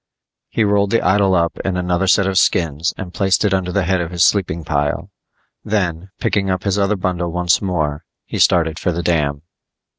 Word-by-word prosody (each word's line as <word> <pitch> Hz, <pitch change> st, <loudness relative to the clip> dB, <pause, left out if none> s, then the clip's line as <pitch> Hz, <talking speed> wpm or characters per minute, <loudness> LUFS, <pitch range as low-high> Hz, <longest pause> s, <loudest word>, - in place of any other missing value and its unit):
He 115 Hz, -, 0 dB
rolled 100 Hz, -1 st, +2 dB
the 115 Hz, -, +1 dB
idol 95 Hz, 0 st, +3 dB
up 85 Hz, -1 st, 0 dB
in 95 Hz, -2 st, -2 dB
another 90 Hz, +1 st, 0 dB
set 100 Hz, +1 st, +4 dB
of 95 Hz, 0 st, +2 dB
skins 80 Hz, -1 st, +1 dB
and 90 Hz, -2 st, -7 dB
placed 95 Hz, +3 st, +1 dB
it 100 Hz, -, +1 dB
under 95 Hz, -1 st, -1 dB
the 100 Hz, +1 st, 0 dB
head 90 Hz, 0 st, 0 dB
of 85 Hz, -, -4 dB
his 85 Hz, -1 st, +1 dB
sleeping 85 Hz, -5 st, 0 dB
pile. 75 Hz, -1 st, -2 dB, 0.5 s
Then, 90 Hz, -4 st, -2 dB
picking 95 Hz, -2 st, 0 dB
up 95 Hz, -1 st, -1 dB
his 100 Hz, 0 st, 0 dB
other 100 Hz, +1 st, +1 dB
bundle 90 Hz, -2 st, -2 dB
once 90 Hz, 0 st, +1 dB
more, 80 Hz, -6 st, -2 dB, 0.2 s
he -, -, -5 dB
started 80 Hz, -2 st, +2 dB
for 90 Hz, -, 0 dB
the 85 Hz, +1 st, -3 dB
dam. 75 Hz, -4 st, 0 dB
90 Hz, 200 wpm, -18 LUFS, 85-95 Hz, 0.5 s, set